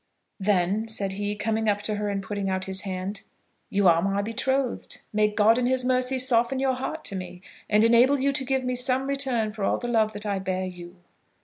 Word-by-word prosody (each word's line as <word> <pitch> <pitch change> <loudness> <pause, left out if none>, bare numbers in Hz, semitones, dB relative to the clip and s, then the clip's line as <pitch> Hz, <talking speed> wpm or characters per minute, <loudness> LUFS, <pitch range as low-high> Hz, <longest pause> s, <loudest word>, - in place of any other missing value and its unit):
"Then," 200 +2 +1
said 205 -3 -1
he, 205 +1 -3
coming 220 +1 0
up 205 0 0
to 210 0 -2
her 210 0 -2
and 195 -1 -2
putting 205 -2 -3
out 185 0 -1
his 190 0 -1
hand, 190 +1 -4 0.5
"you 200 -1 +2
are 165 -1 +5
my 195 +2 0
betrothed. 260 +3 -2
May 210 0 +3
God 215 +3 +3
in 245 - +1
his 255 0 +1
mercy 255 +1 +1
soften 250 0 +2
your 265 0 +1
heart 265 +5 -5
to 195 - -2
me, 180 -1 -7 0.3
and 210 +1 +4
enable 240 +5 +5
you 275 +1 +1
to 270 -1 -2
give 265 0 -1
me 250 0 -1
some 255 +1 +1
return 265 -6 0
for 210 -1 -6
all - - +1
the 240 - -5
love 220 -2 +2
that 205 +1 -6
I 200 -2 -1
bear 185 0 -2
you." 175 -1 -9
215 Hz, 220 wpm, -25 LUFS, 195-255 Hz, 0.5 s, are